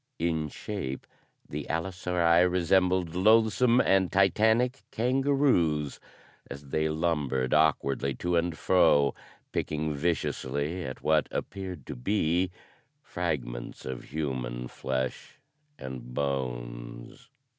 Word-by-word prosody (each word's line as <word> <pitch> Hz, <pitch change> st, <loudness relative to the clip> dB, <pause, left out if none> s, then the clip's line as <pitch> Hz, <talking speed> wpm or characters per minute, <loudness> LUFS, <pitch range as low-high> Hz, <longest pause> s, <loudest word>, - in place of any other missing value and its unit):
In 80 Hz, -2 st, -1 dB
shape 80 Hz, -7 st, -5 dB, 0.4 s
the 75 Hz, 0 st, -5 dB
allosauri 90 Hz, 0 st, +2 dB
resembled 90 Hz, -1 st, +2 dB
loathsome 110 Hz, +5 st, +4 dB
and 95 Hz, -6 st, +3 dB
titanic 110 Hz, +6 st, +3 dB
kangaroos 125 Hz, -, +1 dB, 0.5 s
as 70 Hz, 0 st, -9 dB
they 80 Hz, +2 st, 0 dB
lumbered 75 Hz, -6 st, 0 dB
awkwardly 70 Hz, -3 st, +2 dB
to 90 Hz, +6 st, -1 dB
and 85 Hz, -1 st, 0 dB
fro, 70 Hz, -7 st, +4 dB, 0.4 s
picking 75 Hz, 0 st, -2 dB
viciously 75 Hz, +1 st, -2 dB
at 65 Hz, -, -7 dB
what 80 Hz, -1 st, +3 dB
appeared 95 Hz, -7 st, -5 dB
to -, -, -6 dB
be 90 Hz, +5 st, +1 dB, 0.5 s
fragments 65 Hz, -, -4 dB
of 65 Hz, -1 st, -5 dB
human 65 Hz, -5 st, -3 dB
flesh 65 Hz, 0 st, -4 dB, 0.4 s
and 60 Hz, -2 st, -8 dB
bones. -, -, -4 dB
80 Hz, 100 wpm, -28 LUFS, 65-95 Hz, 0.5 s, loathsome